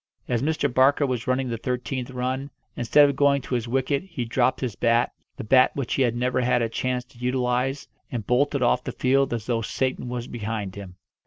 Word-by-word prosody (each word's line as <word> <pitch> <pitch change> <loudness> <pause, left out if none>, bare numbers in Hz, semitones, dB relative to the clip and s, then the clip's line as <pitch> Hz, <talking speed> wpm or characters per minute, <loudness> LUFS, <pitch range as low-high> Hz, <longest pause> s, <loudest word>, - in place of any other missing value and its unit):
As 120 -2 0
Mr. 150 0 +1
Barker 135 +3 +4
was 125 -1 -3
running 130 0 0
the 115 -2 -3
thirteenth 125 +1 -3
run, 130 +2 -3 0.3
instead 145 +5 +5
of 140 - -1
going 140 -1 +3
to - - -6
his 120 -1 -1
wicket 135 +3 0
he 165 -10 -4
dropped 120 +2 +1
his 120 -6 -3
bat 115 +1 +2 0.3
the - - -5
bat 130 +4 +4
which 135 -5 -2
he - - 0
had 120 -2 +2
never 125 +1 0
had 120 -1 +2
a 115 - -1
chance 125 +2 -2
to 125 -1 -21
utilise 125 +2 -1 0.2
and 115 -5 -4
bolted 140 +3 +1
off 120 +1 +2
the - - -5
field 135 +1 +2
as 115 -3 -3
though 115 -2 0
Satan 130 +2 -2
was 120 -1 -4
behind 110 -4 -4
him. 95 -3 -9
125 Hz, 215 wpm, -25 LUFS, 120-135 Hz, 0.3 s, instead